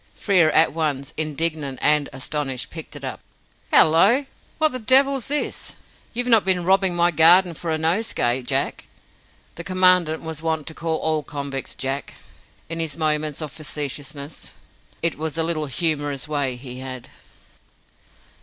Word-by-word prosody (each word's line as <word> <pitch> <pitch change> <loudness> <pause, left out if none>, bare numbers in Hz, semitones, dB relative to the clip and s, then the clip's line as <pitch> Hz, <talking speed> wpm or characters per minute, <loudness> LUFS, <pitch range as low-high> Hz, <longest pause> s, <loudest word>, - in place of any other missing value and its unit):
Frere 185 -6 +3
at - - +5
once, 145 -4 -2
indignant 155 -2 -2
and 150 -1 +3
astonished, 135 -1 -4
picked - - -9
it - - -9
up. - - -4 0.5
"Hallo! 200 - +5 0.3
What 310 -1 +2
the 255 - -5
devil's 265 +1 +3
this? 295 +1 -2 0.4
You've 245 +1 -2
not 230 -4 +5
been 185 -2 +1
robbing 190 -1 +3
my 175 0 +3
garden 170 +3 +6
for 165 +1 -6
a 160 - +1
nosegay, 160 - 0
Jack?" 125 - -2 0.7
The 170 - -6
Commandant 185 -4 +3
was 160 -1 -5
wont 160 -2 -2
to 160 - -6
call 160 0 -2
all 155 -1 0
convicts 140 -2 -5
"Jack" 135 +2 -4 0.5
in 165 0 -5
his 160 -3 -3
moments 155 -1 -1
of 150 - -6
facetiousness. 145 -1 -6 0.5
It 170 -3 0
was 160 0 -3
a 165 - +1
little 160 -2 -1
humorous 145 -2 -1
way 140 -4 -1
he 125 0 -9
had. 130 -2 -8
160 Hz, 150 wpm, -22 LUFS, 145-175 Hz, 0.7 s, garden